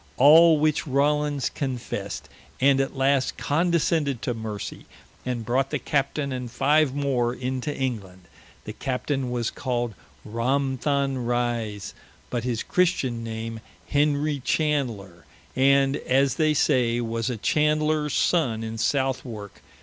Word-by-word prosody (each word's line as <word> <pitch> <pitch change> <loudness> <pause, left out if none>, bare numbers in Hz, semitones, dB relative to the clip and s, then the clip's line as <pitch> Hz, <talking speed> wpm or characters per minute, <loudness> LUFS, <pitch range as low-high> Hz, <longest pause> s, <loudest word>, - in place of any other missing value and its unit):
All 160 +4 +7
which 155 +1 +1
Rawlins 145 0 +1
confessed, 130 -4 -4 0.3
and 135 0 +4
at 135 - -3
last 135 0 +1
condescended 160 -4 +1
to 125 - -1
mercy, 110 -3 -6 0.4
and 120 -3 -2
brought 130 +3 +1
the - - -1
Captaine 140 0 -1
and 125 -2 -4
five 140 +3 +2
more 125 -4 0
into 130 +3 -3
England. 100 -9 -4 0.4
The 105 - -6
Captain 135 +1 -2
was 120 -2 -1
called 120 -3 -2 0.3
Ramtham 135 +3 0
Rise, 120 -4 -2 0.4
but 120 -2 -2
his 120 -2 -2
Christen 135 -10 0
name, 115 0 -5 0.3
Henry 145 0 +1
Chandler, 120 - -1 0.3
and 135 +1 +4
as 135 +1 +2
they 155 -1 +2
say, 120 -4 +2
was 115 0 -2
a 125 - -3
Chandler's 150 +3 +1
sonne 125 -11 +1
in 115 0 -5
Southwarke. 130 -6 -2
130 Hz, 125 wpm, -25 LUFS, 120-145 Hz, 0.4 s, All